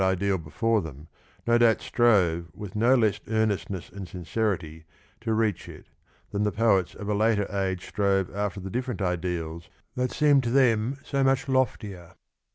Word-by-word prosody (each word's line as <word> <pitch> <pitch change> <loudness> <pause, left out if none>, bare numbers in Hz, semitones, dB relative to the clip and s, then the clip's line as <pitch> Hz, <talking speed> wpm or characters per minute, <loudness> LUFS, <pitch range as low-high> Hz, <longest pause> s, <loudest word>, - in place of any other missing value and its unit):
54 95 0 +3
ideal 100 +1 +1
before 110 +8 0
them 75 -2 -10 0.4
no 120 0 +4
doubt 115 -2 +4
strove 90 -8 +2
with 105 -2 -8
no 120 +5 +4
less 110 -5 +2
earnest 110 -2 0
ness 95 -3 -6
and 95 0 -7
sincerity 85 -3 -3 0.4
to 115 0 -3
reach 110 -4 0
it - - -13 0.4
than 100 - -1
the 105 0 +1
poets 100 -5 +2
of 105 - -7
a 105 - +1
later 105 0 +2
age 95 -2 -1
strove 100 -3 0
after 100 -1 -2
the 95 0 -7
different 125 -2 -3
ideals 85 -3 -3 0.2
that 125 0 -1
seemed 145 -2 +4
to 120 - -1
them 125 -1 +2
so 140 -1 0
much 135 0 +2
loftier. 105 -9 -1
105 Hz, 170 wpm, -26 LUFS, 90-115 Hz, 0.4 s, no